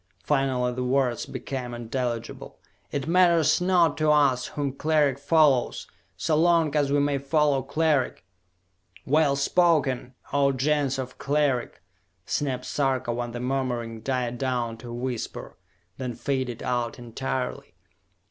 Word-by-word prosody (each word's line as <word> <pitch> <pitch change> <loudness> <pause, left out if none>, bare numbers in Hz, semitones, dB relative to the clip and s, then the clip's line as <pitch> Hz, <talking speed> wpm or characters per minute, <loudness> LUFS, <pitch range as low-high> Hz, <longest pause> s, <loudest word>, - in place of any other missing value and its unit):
Finally 130 -4 +1
the 125 +1 -3
words 125 -2 0
became 125 -3 -5
intelligible. 120 0 -4 0.3
"It 140 - -2
matters 170 -2 +4
not 175 -4 +3
to 155 0 +2
us 140 -4 +3
whom 140 -2 -3
Cleric 145 -2 +1
follows, 145 -4 +3 0.3
so 155 - 0
long 165 -2 +3
as 145 -2 +2
we 145 - +3
may 140 -1 +1
follow 140 0 +2
Cleric!" 150 - 0 0.8
"Well 145 0 +3
spoken, 140 -5 +1 0.2
O 140 -1 +3
Gens 140 0 +1
of 130 -1 -6
Cleric!" 140 - 0 0.4
snapped 130 -3 -2
Sarka 130 -2 0
when 120 0 -3
the 120 - -5
murmuring 125 -3 -2
died 125 -1 -2
down 125 -3 -1
to 115 - -11
a - - -6
whisper, 125 -1 -5 0.4
then 125 -3 -4
faded 130 -4 -3
out 120 -2 -1
entirely. 125 +2 -4
135 Hz, 130 wpm, -26 LUFS, 125-145 Hz, 0.8 s, matters